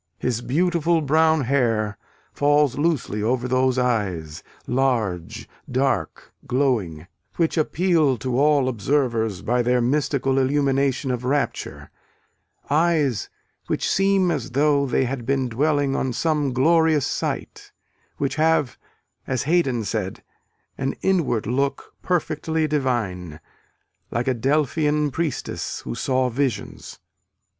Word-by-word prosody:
His 120 Hz, -2 st, -2 dB
beautiful 170 Hz, +4 st, +1 dB
brown 160 Hz, +2 st, +3 dB
hair 115 Hz, -6 st, +1 dB, 0.4 s
falls 145 Hz, -2 st, +3 dB
loosely 145 Hz, -9 st, -1 dB
over 125 Hz, +3 st, 0 dB
those 130 Hz, 0 st, +1 dB
eyes, 95 Hz, -11 st, -1 dB, 0.2 s
large, 115 Hz, -10 st, -1 dB, 0.2 s
dark, 130 Hz, 0 st, -1 dB
glowing, 110 Hz, -, 0 dB, 0.3 s
which 165 Hz, -2 st, +1 dB
appeal 160 Hz, -4 st, +2 dB
to 125 Hz, +2 st, -2 dB
all 145 Hz, -2 st, +3 dB
observers 115 Hz, -4 st, 0 dB
by 125 Hz, +2 st, +1 dB
their 125 Hz, +1 st, +2 dB
mystical 135 Hz, +1 st, +1 dB
illumination 135 Hz, 0 st, +1 dB
of 125 Hz, -1 st, -3 dB
rapture 140 Hz, +3 st, -2 dB, 0.8 s
eyes 150 Hz, -6 st, +1 dB, 0.4 s
which -, -, -1 dB
seem 195 Hz, -1 st, +2 dB
as 145 Hz, -7 st, -3 dB
though 140 Hz, 0 st, +2 dB
they 130 Hz, -, +1 dB
had 125 Hz, -1 st, -4 dB
been 135 Hz, +1 st, 0 dB
dwelling 145 Hz, +2 st, +1 dB
on 130 Hz, -2 st, -1 dB
some 150 Hz, +1 st, 0 dB
glorious 155 Hz, +2 st, +3 dB
sight -, -, -4 dB, 0.5 s
which 140 Hz, +2 st, -2 dB
have, 155 Hz, -4 st, +1 dB, 0.5 s
as 130 Hz, -3 st, -1 dB
Haydon 140 Hz, -8 st, +1 dB
said, 100 Hz, -2 st, -4 dB, 0.6 s
"an 135 Hz, +1 st, -1 dB
inward 165 Hz, -, +1 dB
look 135 Hz, +4 st, -2 dB
perfectly 160 Hz, -2 st, -1 dB
divine, 105 Hz, -, -2 dB, 0.7 s
like 120 Hz, +2 st, -2 dB
a 130 Hz, -, +3 dB
Delphian 150 Hz, +3 st, +1 dB
priestess 160 Hz, -2 st, -3 dB
who 60 Hz, -, -5 dB
saw 130 Hz, -, 0 dB
visions." 130 Hz, +1 st, -3 dB
135 Hz, 115 wpm, -23 LUFS, 120-150 Hz, 0.8 s, brown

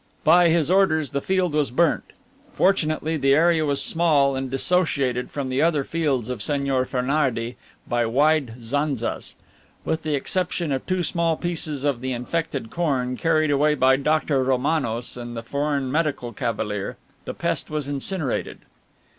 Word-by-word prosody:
By 170 Hz, +2 st, +6 dB
his 165 Hz, 0 st, +2 dB
orders 160 Hz, -6 st, +2 dB
the 140 Hz, -, -2 dB
field 185 Hz, -2 st, 0 dB
was 150 Hz, -4 st, +1 dB
burnt. 165 Hz, +7 st, +1 dB, 0.5 s
Fortunately, 160 Hz, -4 st, +1 dB
the 135 Hz, -1 st, +3 dB
area 165 Hz, 0 st, +3 dB
was 140 Hz, -1 st, +1 dB
small 150 Hz, -5 st, +3 dB
and 130 Hz, 0 st, -3 dB
dissociated 135 Hz, -4 st, 0 dB
from 140 Hz, -2 st, -4 dB
the 130 Hz, +2 st, 0 dB
other 155 Hz, -3 st, +2 dB
fields 140 Hz, -8 st, -1 dB
of 125 Hz, -3 st, -4 dB
Señor 135 Hz, +1 st, 0 dB
Fernardey 125 Hz, -3 st, -1 dB, 0.3 s
by 120 Hz, -1 st, +1 dB
wide 140 Hz, 0 st, +2 dB
zanzas. 140 Hz, -1 st, -2 dB, 0.5 s
With 160 Hz, 0 st, -1 dB
the 155 Hz, -2 st, -1 dB
exception 175 Hz, +2 st, -1 dB
of 135 Hz, -1 st, -3 dB
two 185 Hz, -1 st, 0 dB
small 165 Hz, -1 st, 0 dB
pieces 155 Hz, -5 st, -2 dB
of 140 Hz, -5 st, 0 dB
the 130 Hz, 0 st, -2 dB
infected 135 Hz, -1 st, -3 dB
corn, 130 Hz, -7 st, -1 dB
carried 155 Hz, 0 st, +1 dB
away 150 Hz, +2 st, +3 dB
by 130 Hz, -1 st, +4 dB
Dr. 145 Hz, -1 st, +1 dB
Romanos 130 Hz, -3 st, -1 dB
and 120 Hz, -1 st, -7 dB
the 115 Hz, -, -5 dB
foreign 140 Hz, +1 st, -1 dB
medical 140 Hz, -6 st, -1 dB
cavalier, 105 Hz, -3 st, -3 dB, 0.3 s
the -, -, -5 dB
pest -, -, -2 dB
was 150 Hz, -2 st, -3 dB
incinerated.'" 145 Hz, +1 st, -2 dB
145 Hz, 155 wpm, -23 LUFS, 130-160 Hz, 0.5 s, By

